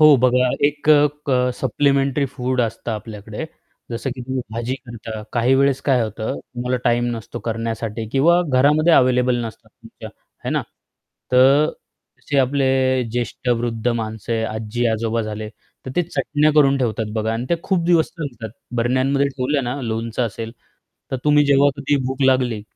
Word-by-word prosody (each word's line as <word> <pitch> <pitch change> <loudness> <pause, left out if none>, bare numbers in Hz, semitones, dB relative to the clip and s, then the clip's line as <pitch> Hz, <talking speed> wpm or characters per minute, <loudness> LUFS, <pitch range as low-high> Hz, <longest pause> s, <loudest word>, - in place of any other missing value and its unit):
हो 155 -2 +8
बघा, 125 0 +4 0.2
एक 145 +1 -4
अ, 150 -1 +6 0.2
अ, 125 0 +2
सप्लिमेंटरी 140 +1 +1
फूड 130 -1 -1
असतं 115 0 -2
आपल्याकडे 105 +3 -6 0.5
जसं 120 +3 -3
की 130 - -8
तुम्ही 130 0 -3
भाजी 120 +3 -2
करता 115 -4 -8
काही 120 +2 +3
वेळेस 140 0 +2
काय 135 -3 +2
होतं, 110 0 -4
तुम्हाला 125 +1 -3
टाईम 120 0 +2
नसतो 115 +2 -7
करण्यासाठी 115 0 -3
किंवा 170 +6 +4
घरामध्ये 150 +6 +4
अवेलेबल 125 -2 +4
नसतात 110 - -9
तुमच्या, - - -12 0.4
हे - - -2
ना? - - 0 0.7
तर 135 +4 +6 0.5
जसे 140 - -1
आपले 135 +1 +2 0.4
ज्येष्ठ 120 +1 -3
वृद्ध 120 -1 0
माणसं 110 -1 -3
आहे, 110 -1 0
आजी-आजोबा 115 +1 -1
झाले, 110 0 -5 0.4
तर 130 - -4
ते 175 - +3
चटण्या 155 -2 +1
करून 140 -2 +5
ठेवतात 110 -4 -2
बघा 110 0 -1
आणि 115 +2 -3
ते 170 - +4
खूप 185 -4 0
दिवस 170 -2 +4
चालतात. 120 -8 -6 0.3
बरण्यांमध्ये 130 +4 +2
ठेवलं 135 +1 -1
ना, 125 +3 -3
लोणचं 115 +1 -2
असेल, 115 +2 -6 0.6
तर 130 - -1
तुम्ही 150 0 +5
जेव्हा 140 0 +5
कधी 140 +1 0
भूक 130 +1 -2
लागली, 125 -5 +2
125 Hz, 160 wpm, -21 LUFS, 115-140 Hz, 0.7 s, हो